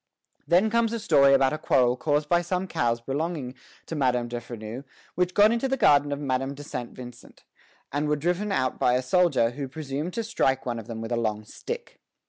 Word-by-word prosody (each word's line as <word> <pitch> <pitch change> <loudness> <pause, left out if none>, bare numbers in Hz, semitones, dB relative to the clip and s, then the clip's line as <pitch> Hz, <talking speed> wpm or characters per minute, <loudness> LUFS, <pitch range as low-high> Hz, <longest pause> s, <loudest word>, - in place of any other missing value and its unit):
Then 185 +6 +3
comes 230 0 +2
a 230 - -2
story 140 -9 +5
about 135 0 +3
a 155 - -3
quarrel 125 -1 +3
caused 150 +2 0
by 175 +2 +3
some 180 +2 -2
cows 120 -7 0
belonging 140 +1 -3 0.3
to - - -7
Madame 125 -4 +1
de 120 0 -4
Freneuse 115 +2 -8 0.3
which 180 0 -1
got 210 +2 +6
into 235 +3 0
the 270 0 -1
garden 145 - +4
of 140 - -2
Madame 135 -1 -2
de 145 - -9
Saint 125 -4 -5
Vincent, 125 -2 -12 0.5
and 145 +2 -1
were 150 - +2
driven 180 +7 -1
out 130 -9 0
by 125 - +3
a 130 - 0
soldier 135 -6 +3
who 135 +2 -5
presumed 150 +4 -5
to 230 - -1
strike 135 - 0
one 120 -2 -2
of 110 - -10
them 115 -1 -6
with 115 +1 -6
a 120 - +1
long 110 -2 -2
stick. 475 - -7
140 Hz, 215 wpm, -26 LUFS, 125-175 Hz, 0.5 s, got